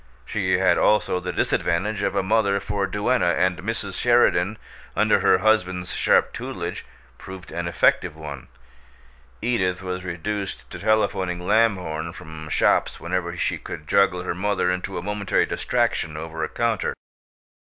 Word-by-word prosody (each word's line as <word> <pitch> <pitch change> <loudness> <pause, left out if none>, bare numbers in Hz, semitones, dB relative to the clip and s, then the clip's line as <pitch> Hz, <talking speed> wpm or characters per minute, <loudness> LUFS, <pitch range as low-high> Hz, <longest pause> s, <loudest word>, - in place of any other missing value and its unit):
She 95 - 0
had 90 -2 +3
also 105 -3 +3
the 90 0 -4
disadvantage 95 +5 0
of - - -1
a - - +1
mother 100 0 +2
for 100 -1 -2
duenna, 105 -3 +1
and 90 0 +1
Mrs. 100 -1 -4
Sheridan, 110 -4 +3 0.4
under - - +3
her - - +4
husband's 95 -4 +1
sharp - - +3
tutelage, - - -5 0.3
proved 95 -1 -10
an 85 0 -3
effective 85 -2 +2
one. 75 -4 -8 1.0
Edith 95 -6 0
was 90 0 -4
reduced 95 +3 -4
to - - -7
telephoning 95 -5 +1
Lamhorn 90 -6 +1
from 80 0 -9
shops - - +2
whenever 85 0 -3
she - - -1
could 80 -2 -8
juggle 95 -2 +3
her 90 - -2
mother 95 0 0
into 90 +1 -3
a 85 - -4
momentary 105 0 0
distraction 75 -1 -1
over 80 0 -5
a 80 - -2
counter. 115 -3 -1
90 Hz, 145 wpm, -23 LUFS, 85-105 Hz, 1.0 s, her